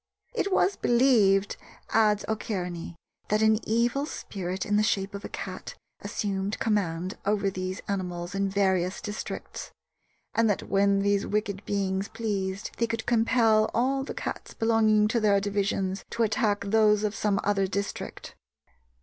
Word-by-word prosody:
"It 425 -4 -1
was 380 +1 +3
believed," 220 -6 +3 0.3
adds 210 -2 +3
O'Kearney, 180 -6 -3 0.3
"that 215 +1 +2
an 220 0 +4
evil 240 +6 +1
spirit 190 - -4
in 205 - +1
the 210 - +4
shape 200 -2 0
of 200 0 -6
a - - -6
cat - - -6 0.2
assumed 200 -2 -2
command 185 -4 -1
over 200 -1 +1
these 185 0 -4
animals 180 -2 -3
in 195 0 0
various 190 -2 +1
districts, 210 -1 -6 0.6
and 230 -1 +3
that 205 - 0
when 200 0 +2
those 200 0 +1
wicked 210 -1 -2
beings 195 -1 -1
pleased 200 -4 -3
they 230 - +2
could 225 -1 -3
compel 225 -2 +3
all 270 +3 +1
the - - -6
cats - - -5
belonging 220 -2 +3
to 235 +2 +1
their 205 -2 +4
division 195 -1 -1
to 235 - 0
attack 215 -2 +1
those 210 0 +3
of 210 -1 0
some 205 -2 0
other 195 -1 +1
district. 200 +1 -5
205 Hz, 150 wpm, -27 LUFS, 195-220 Hz, 0.6 s, an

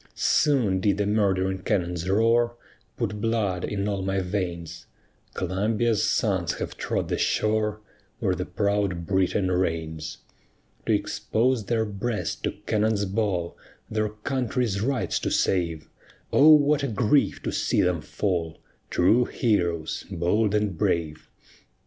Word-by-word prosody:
Soon 125 -11 +2
did 100 +1 +1
the 105 - 0
murdering 95 -2 +1
cannon's 90 -1 -1
roar 115 +3 +3 0.4
Put 105 -3 -3
blood 105 -5 0
in 100 -1 -2
all 100 -2 -1
my 95 +1 -1
veins; 90 -3 -4 0.5
Columbia's 105 +4 0
sons 95 -5 +1
have - - -5
trod - - -2
the - - -2
shore 110 0 0 0.4
Where - - 0
the - - -4
proud 100 -4 -1
Britain 95 0 +1
reigns. 80 -3 -2 0.7
To - - +2
expose 120 -1 0
their 110 +1 0
breast 105 +2 -3
to - - -1
cannon's 105 -1 +1
ball, 95 -4 -1 0.4
Their 110 0 0
country's 120 -1 -2
rights 130 +3 0
to - - -2
save, 85 -5 0 0.5
O 150 +3 +7
what 150 -1 +6
a 140 - 0
grief 120 +5 +1
to - - -2
see - - +1
them 90 -3 +1
fall! 85 -2 -2 0.3
True 110 +8 +3
heroes, 85 -8 -1
bold 105 +5 +1
and 105 -3 0
brave! 80 -1 -1
100 Hz, 130 wpm, -25 LUFS, 90-110 Hz, 0.7 s, O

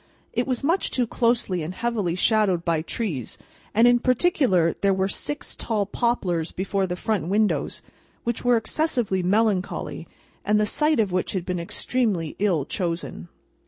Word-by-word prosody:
It 240 +2 0
was 255 -1 -1
much 335 +7 +1
too 250 - +1
closely 230 -6 +1
and 165 +4 -5
heavily 215 -7 -1
shadowed 190 -3 +2
by 165 -2 +1
trees, 160 - -4 0.3
and, 225 +3 +5
in 245 0 +5
particular, 250 - +2
there 195 -1 +3
were 190 0 +1
six 295 +8 -4
tall 215 -3 -1
poplars 190 -7 -1
before 195 +1 -1
the 180 - -3
front 185 -3 -1
windows, 210 +2 0 0.4
which 235 -1 -2
were 245 -1 +4
excessively 230 - 0
melancholy, 200 0 0 0.4
and 210 0 +2
the 210 - +3
site 300 +6 +2
of 205 -4 +2
which 180 0 -1
had 185 -3 -2
been 180 -1 -2
extremely 180 -1 -1
ill 180 -9 +1
chosen. 165 - -4
205 Hz, 160 wpm, -24 LUFS, 180-235 Hz, 0.4 s, and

